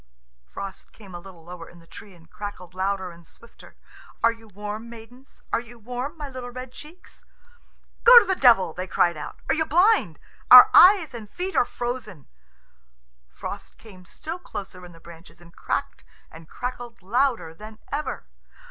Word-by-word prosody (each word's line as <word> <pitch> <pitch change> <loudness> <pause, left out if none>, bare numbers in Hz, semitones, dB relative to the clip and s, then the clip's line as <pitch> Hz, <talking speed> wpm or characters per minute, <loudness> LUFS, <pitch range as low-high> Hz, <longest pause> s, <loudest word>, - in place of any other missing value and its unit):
Frost 195 -1 -9
came 200 -4 -15
a 175 - -7
little 175 -2 -14
lower 170 0 -10
in 175 - -17
the 165 - -18
tree, 200 +3 -13
and 165 -1 -20
crackled 190 -4 -8
louder 190 0 -2
and 170 -1 -17
swifter. 235 - -17 0.5
"Are 230 - +5
you 225 -1 -14
warm, 210 +3 -7
maidens? 235 +3 -15
Are - - +3
you 240 0 -13
warm, 250 +7 -6
my 295 -2 -6
little 255 -2 -8
red 255 +1 -9
cheeks?" 310 +7 -14 0.8
"Go 485 +1 +10
to 475 - +8
the 380 - +1
devil!" 230 - +4
they 185 +1 -5
cried 175 -2 +1
out. 150 - -8
"Are - - +2
you 315 - +1
blind? 345 - +2 0.3
Our 250 0 +11
hands 360 -6 +7
and 220 -3 -9
feet 370 - -5
are - - +4
frozen!" 240 - -6 1.0
Frost - - -9
came 190 -5 -16
still 320 - -8
lower 190 -2 -7
in - - -16
the 165 - -16
branches, 165 +1 -15
and 170 -1 -18
cracked - - -4 0.3
and 160 0 -14
crackled 245 -4 -7
louder 230 -5 0
than 215 +5 -12
ever. 290 +2 -4
220 Hz, 175 wpm, -24 LUFS, 180-255 Hz, 1.0 s, Our